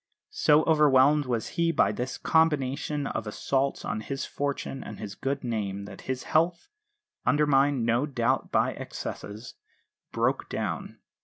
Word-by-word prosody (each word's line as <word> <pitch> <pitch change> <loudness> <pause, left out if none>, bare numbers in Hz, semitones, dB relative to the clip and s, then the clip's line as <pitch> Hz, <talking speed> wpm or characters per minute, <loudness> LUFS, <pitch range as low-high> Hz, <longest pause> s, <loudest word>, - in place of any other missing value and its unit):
So 155 - +4
overwhelmed 150 -2 +4
was 120 -3 -1
he 170 0 +1
by 105 -10 +3
this 125 +5 -4
combination 150 -2 +1
of 110 - -3
assaults 135 +6 -1
on 105 +1 -2
his 135 +4 -4
fortune 140 -1 -3
and - - -8
his 105 -2 -6
good 135 +6 -3
name 100 -4 -3
that 100 -1 -10
his 130 -1 -2
health 165 +2 +1 0.5
undermined 145 -3 +3
no 120 +5 +2
doubt 125 -5 0
by - - +2
excesses 105 +4 -7 0.6
broke - - 0
down. - - -4
135 Hz, 140 wpm, -27 LUFS, 115-150 Hz, 0.6 s, So